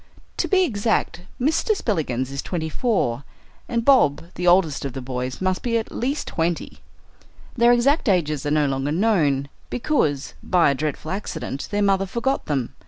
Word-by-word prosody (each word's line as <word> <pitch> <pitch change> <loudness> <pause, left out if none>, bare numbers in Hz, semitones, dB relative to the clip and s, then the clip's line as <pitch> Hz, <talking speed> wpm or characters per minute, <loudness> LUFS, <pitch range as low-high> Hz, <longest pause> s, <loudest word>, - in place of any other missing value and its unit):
To - - 0
be 380 -2 +4
exact, 215 - 0 0.2
Mr. 315 - +1
Spillikins 135 - -1
is 140 - -3
twenty 160 -3 -3
four, 150 - 0 0.5
and 230 -1 -1
Bob, 170 - +4
the 180 - -3
oldest 175 -5 +3
of 135 -3 -4
the 135 - -5
boys, 125 0 -4
must 185 0 0
be 230 -2 0
at 225 - -4
least 275 +5 -2
twenty. 165 0 -2 0.8
Their 240 -1 +5
exact 255 +2 +3
ages 155 -7 +1
are 145 - -1
no 150 0 +2
longer 135 +1 -1
known, 155 -8 +2 0.2
because, 195 - 0
by 175 -5 +3
a - - +1
dreadful 155 +2 -3
accident, 160 -8 -4
their 205 0 0
mother 195 -1 +2
forgot 240 +7 -1
them. 135 -5 -1
175 Hz, 170 wpm, -23 LUFS, 145-230 Hz, 0.8 s, Their